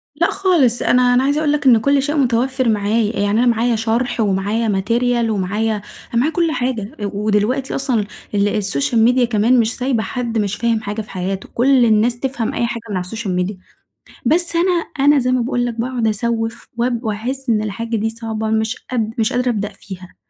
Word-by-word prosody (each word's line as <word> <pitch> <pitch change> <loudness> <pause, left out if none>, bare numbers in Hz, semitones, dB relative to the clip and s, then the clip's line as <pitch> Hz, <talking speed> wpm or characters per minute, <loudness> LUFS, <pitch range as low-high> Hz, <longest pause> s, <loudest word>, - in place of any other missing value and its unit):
لأ 340 +3 +1
خالص، 335 -12 +2
أنا 250 0 +3
أنا 250 +1 +3
عايزة 285 +2 +1
أقول 305 -2 +1
لك 295 -1 -1
إن 250 -3 +7
كل 280 +5 +2
شيء 290 +3 -2
متوفر 255 0 +1
معايا. 215 +1 +1
يعني 205 0 +1
أنا 245 - +3
معايا 235 0 +2
شرح 230 +3 -1
ومعايا 210 +2 0
Material 230 +4 +1
ومعايا 210 +2 -1 0.4
أنا 235 - +2
معايا 310 +5 +1
كل 335 -2 +1
حاجة. 245 -5 -2 0.2
ودلوقتي 215 +6 0
أصلًا 250 -6 0 0.3
ال 205 +1 +1
الSocial 165 - -1
media 250 0 +3
كمان 235 +2 +3
مش 230 0 +1
سايبة 250 -3 0
حد 235 -2 -3
مش 205 -1 0
فاهم 230 -1 0
حاجة 210 +1 -4
في 215 - -13
حياته. 190 +1 -4
كل 255 0 +4
الناس 230 +2 +2
تفهم 255 -4 -2
أي 235 - 0
حاجة 230 -1 -5
من 200 - -2
على 180 - -3
الSocial 185 -4 -2
media 205 - -6 0.7
بس 340 +1 +2
أنا 355 +2 +3 0.4
أنا 290 -1 +6
زي 255 0 0
ما 255 - +2
باقول 245 0 -1
لك 240 - -2
باقعد 245 -2 -1
أسَوّف 225 +1 -2
وأب 240 0 -1
وأحس 245 +5 -3
إن 215 -2 +2
الحاجة 230 +2 -3
دي 220 +1 -1
صعبة 225 -1 -4
مش 220 +1 0 0.2
قاد 225 -3 -1
مش 220 -1 +1
قادرة 250 0 +1
أبدأ 205 -3 -1
فيها. 190 -3 -11
230 Hz, 200 wpm, -18 LUFS, 215-250 Hz, 0.7 s, إن